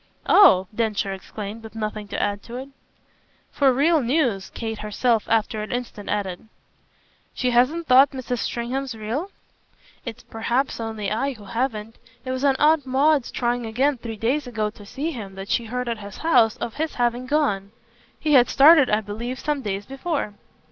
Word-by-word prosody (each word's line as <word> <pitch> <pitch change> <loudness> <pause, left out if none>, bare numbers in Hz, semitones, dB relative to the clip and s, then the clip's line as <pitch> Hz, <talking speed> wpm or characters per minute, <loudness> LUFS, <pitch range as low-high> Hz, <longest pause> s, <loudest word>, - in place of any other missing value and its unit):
"Oh!" 275 - +7
Densher 210 -3 -1
exclaimed, 205 +3 -7
with 220 0 -12
nothing 215 -1 -4
to - - -4
add 205 0 -1
to 235 - -10
it. 265 +2 -6 0.8
"For 275 -2 +3
real 300 +5 +3
news," 240 -7 0
Kate 225 -2 -5
herself 215 +2 0
after 220 -1 +1
an 215 - -6
instant 240 -4 -5
added. 200 -1 -3 0.9
"She 250 -1 0
hasn't 265 +8 +2
thought 265 +1 +6
Mrs. 255 -3 -4
Stringham's 250 +2 -3
real?" 230 - -3 0.7
"It's 235 -3 -8
perhaps 235 +5 -1
only 220 -3 -3
I 270 +6 0
who 215 -4 -14
haven't. 225 0 -3 0.3
It 255 - -3
was 260 +1 -3
on 275 -2 +4
Aunt 300 -1 +3
Maud's 275 +1 +2
trying 240 -1 -1
again 260 +4 +1
three 225 -1 -6
days 255 +6 0
ago 215 -3 -2
to 205 -1 -14
see 295 +9 -3
him 200 -8 -8
that 195 +1 -8
she 235 - +1
heard 250 +2 -3
at 230 -2 -2
his 200 -1 -9
house 245 -9 +3
of 230 - -4
his 315 +1 -2
having 245 +1 0
gone. 230 -10 0 0.5
He 305 -1 +1
had 250 -3 +6
started 285 0 +7
I 210 +1 +2
believe 225 +5 -5
some 295 -2 -1
days 200 -3 -3
before." 270 - -3
240 Hz, 175 wpm, -23 LUFS, 215-270 Hz, 0.9 s, Oh